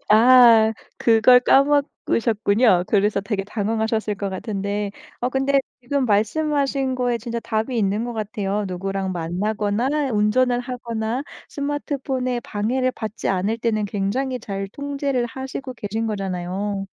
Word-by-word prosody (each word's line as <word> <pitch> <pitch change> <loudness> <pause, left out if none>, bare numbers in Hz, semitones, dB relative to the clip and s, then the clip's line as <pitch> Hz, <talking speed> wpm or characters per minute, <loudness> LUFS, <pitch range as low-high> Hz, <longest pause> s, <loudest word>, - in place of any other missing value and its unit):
아 225 -1 +7 0.2
그걸 230 +2 +6
까먹으셨군요. 230 -8 +2
그래서 205 -1 +2
되게 200 -1 -2
당황하셨을 220 +1 -1
것 200 0 -3
같은데 200 +1 -3 0.3
어 245 - 0
근데 270 +1 +2 0.2
지금 265 +2 -1
말씀하신 270 +4 +1
거에 245 -1 0
진짜 235 0 -5
답이 225 +3 -2
있는 205 +2 0
것 240 - -4
같아요. 210 -2 -2
누구랑 190 +1 -3
만나거나 210 - -1
운전을 245 +4 +2
하거나 240 -1 -3 0.3
스마트폰에 275 -3 -2
방해를 240 +5 -1
받지 220 -1 -5
않을 195 +4 0
때는 220 -3 -1
굉장히 230 +7 -2
잘 195 -3 -5
통제를 280 -1 -2
하시고 265 +2 -6
계신 220 0 -3
거잖아요. 195 0 -3
225 Hz, 305 characters per minute, -22 LUFS, 205-255 Hz, 0.3 s, 아